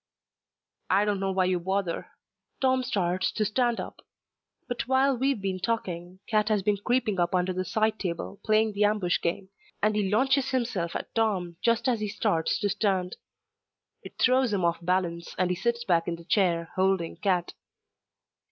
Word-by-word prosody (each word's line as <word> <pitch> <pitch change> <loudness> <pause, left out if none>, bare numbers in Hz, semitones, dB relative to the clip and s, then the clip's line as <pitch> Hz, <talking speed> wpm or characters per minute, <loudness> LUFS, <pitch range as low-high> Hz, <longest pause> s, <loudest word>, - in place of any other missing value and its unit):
"I 200 +2 +4
don't 205 -2 0
know 195 0 -1
why 190 -1 +2
you 180 -1 +1
bother." 190 0 -2 0.5
Tom 260 -1 +2
starts 185 -6 0
to 215 - 0
stand 240 +3 +1
up. - - -7 0.7
But 245 -2 -3
while 265 +1 +3
we've 265 0 0
been 190 -1 -2
talking, 185 -3 -3
Cat 215 -1 +2
has 210 -3 +1
been 205 +1 +2
creeping 220 -2 0
up 175 +1 +1
under 180 +1 +1
the 185 +1 -2
side 215 +4 0
table, 180 +2 -4
playing 215 0 +2
the 205 +1 +1
ambush 205 -4 +1
game, 190 +3 -2 0.3
and 210 0 +2
he 205 -2 +1
launches 265 +5 +2
himself 230 -10 -1
at - - -5
Tom 190 -7 0
just 230 +2 +2
as 240 -3 +2
he 210 - -2
starts 200 -5 0
to 205 - +1
stand. 195 -3 0 0.8
It - - -12
throws 255 -1 +3
him 190 -4 +1
off 170 0 +1
balance 175 -1 -1
and 180 0 +1
he - - 0
sits 235 +6 -1
back 170 -5 +1
in 170 - -1
the 170 0 -14
chair, 170 -4 +1
holding 190 -3 +1
Cat. 180 -1 0
195 Hz, 180 wpm, -27 LUFS, 180-220 Hz, 0.8 s, I